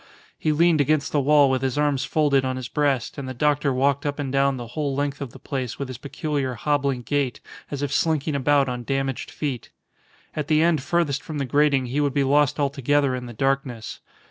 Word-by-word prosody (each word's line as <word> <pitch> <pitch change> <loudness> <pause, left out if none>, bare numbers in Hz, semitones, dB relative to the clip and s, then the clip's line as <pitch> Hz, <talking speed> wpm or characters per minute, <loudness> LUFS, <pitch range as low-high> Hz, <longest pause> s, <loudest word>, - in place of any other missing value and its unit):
He 155 - +1
leaned 160 0 +4
against 145 0 +1
the 150 - +2
wall 145 +1 +5
with 130 -1 0
his 135 0 -1
arms 145 -3 +1
folded 145 -3 +2
on 130 0 -1
his 130 -1 -5
breast, 140 -2 0
and 130 -2 -5
the 130 - -6
doctor 145 +1 +1
walked 140 +2 +1
up 145 -1 -2
and 140 -3 -3
down 135 -1 +2
the 120 -2 -7
whole 140 +2 -2
length 145 0 -2
of 140 - -4
the - - -13
place 130 -5 -4
with 140 -2 -5
his 125 -2 -7
peculiar 140 -2 -3
hobbling 140 0 0
gait, 140 -2 -1 0.3
as 145 -1 -4
if 140 - -2
slinking 155 -2 +1
about 140 0 +3
on 125 -1 -4
damaged 135 0 -2
feet. 135 -7 -4 0.7
At 150 -2 -3
the 155 -1 +3
end 165 -4 +2
furthest 145 -2 0
from 155 -2 -6
the 140 - -1
grating 140 0 +2
he 135 +4 -1
would 145 -1 0
be 140 - +3
lost 145 +1 +2
altogether 140 0 +1
in 125 -1 -4
the 120 - -8
darkness. 130 -2 -2
140 Hz, 220 wpm, -24 LUFS, 130-145 Hz, 0.7 s, wall